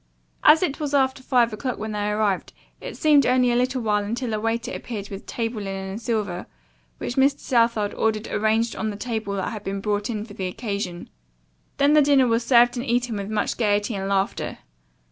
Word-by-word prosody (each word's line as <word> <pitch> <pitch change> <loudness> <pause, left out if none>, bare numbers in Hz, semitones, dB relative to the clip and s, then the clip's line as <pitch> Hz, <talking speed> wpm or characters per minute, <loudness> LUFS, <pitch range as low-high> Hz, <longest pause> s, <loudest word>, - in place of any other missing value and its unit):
As 315 +3 +7
it 295 -3 -1
was 290 -2 -1
after 265 -1 +2
five 245 -3 +2
o'clock 250 +4 -3
when 215 +1 -5
they 210 0 -1
arrived 210 -2 0 0.3
it - - -8
seemed 300 -3 +5
only 250 -1 +3
a - - +1
little 250 0 0
while 210 -1 +1
until 230 +3 -3
a 215 - -1
waiter 230 +3 -2
appeared 205 -4 -6
with 195 0 -8
table 225 -2 -3
linen 195 -1 -5
and 210 +4 -6
silver, 210 -6 -2 0.5
which 240 - -5
Mr. 275 +1 +4
Southard 230 -4 +1
ordered 220 -1 0
arranged 220 +2 +1
on 220 - -2
the 205 - -5
table 220 -3 -3
that 190 +2 -2
had 215 -2 -7
been 195 0 -3
brought 205 +1 -1
in 215 -2 -3
for 215 - -12
the 190 -2 -3
occasion. 200 -3 -4 0.7
Then 280 +1 +4
the 305 - +7
dinner 280 -2 +4
was 230 -1 +1
served 240 0 +5
and 240 - -3
eaten 240 -1 0
with 200 0 -5
much 215 -1 -1
gayety 210 0 +1
and 195 -1 -3
laughter. 195 0 -1
225 Hz, 205 wpm, -24 LUFS, 205-250 Hz, 0.7 s, As